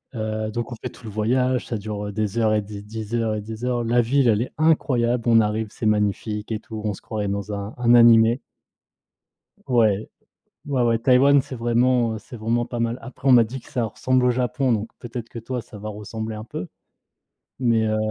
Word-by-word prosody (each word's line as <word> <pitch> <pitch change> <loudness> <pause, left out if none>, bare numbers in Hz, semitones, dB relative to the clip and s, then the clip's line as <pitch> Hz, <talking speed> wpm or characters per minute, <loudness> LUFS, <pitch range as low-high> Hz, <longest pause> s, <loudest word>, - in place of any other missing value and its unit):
Heu, 110 -1 -2
donc 120 +2 -4
on - - -4
fait - - -3
tout 125 - -16
le 110 - -6
voyage, 125 +4 +1
ça 115 - -2
dure 105 0 -5
des 105 +1 -2
heures 110 -1 +3
et 105 - +2
des 100 0 -8
des 110 +1 -7
heures 115 -2 0
et 105 - -3
des 110 +2 -8
heures. 125 -1 0
La 120 +1 +3
ville 130 +3 +2
elle 110 -2 +3
est 125 - -4
incroyable, 125 -7 +2
on 115 -1 +6
arrive, 110 0 0
c'est 110 - -6
magnifique 105 +1 0
et 110 - -1
tout, 110 0 -8
on 105 -1 -1
se - - -15
croirait 105 -2 -3
dans 100 +1 -3
un 100 +1 -5
un 120 -1 +3
animé. 115 +1 +6 1.3
Ouais. 110 -5 +2 0.6
Ouais, 140 -3 0
ouais 115 -1 +2
Taïwan 135 +3 +5
c'est 130 - -8
vraiment, 120 0 +2
heu, - - -5
c'est 120 +2 -11
vraiment 115 +2 0
pas 120 0 -5
mal. 115 +1 -1
Après 135 +1 -4
on - - +7
m'a 120 -2 +7
dit 125 +4 -7
que - - -18
ça 120 -2 -1
ressemble 125 +4 0
au 125 - +4
Japon, 125 +1 0
donc 110 0 -1
peut-être 120 -1 -7
que 115 - -8
toi 125 +2 -4
ça 110 - -13
va 105 +1 -6
ressembler 110 +1 -6
un 105 - -7
peu, 90 -6 -6 0.9
mais 115 -3 +2
heu 110 0 0
115 Hz, 220 wpm, -23 LUFS, 110-120 Hz, 1.3 s, on